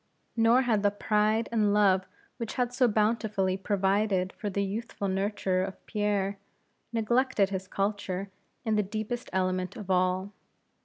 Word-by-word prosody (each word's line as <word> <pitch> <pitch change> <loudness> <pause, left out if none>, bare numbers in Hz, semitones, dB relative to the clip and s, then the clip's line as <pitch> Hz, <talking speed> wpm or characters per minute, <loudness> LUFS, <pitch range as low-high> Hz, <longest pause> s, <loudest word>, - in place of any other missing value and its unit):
Nor 230 +3 +5
had 225 -4 +2
that 205 0 0
pride 215 +1 +2
and 210 -3 +2
love 190 -3 +4 0.3
which 230 -3 -5
had 245 -1 0
so 250 0 +4
bountifully 215 -3 +1
provided 195 -1 +1
for 210 - -4
the 200 +1 -1
youthful 205 0 -4
nurture 190 -1 0
of 190 0 -7
Pierre, 205 -2 -1 0.5
neglected 235 -2 +2
his 190 -1 -3
culture 195 -1 -2 0.3
in 220 -1 +1
the - - +4
deepest 215 +4 -4
element 185 +1 -1
of 205 -5 -5
all. 185 +2 +1
205 Hz, 145 wpm, -29 LUFS, 190-220 Hz, 0.5 s, Nor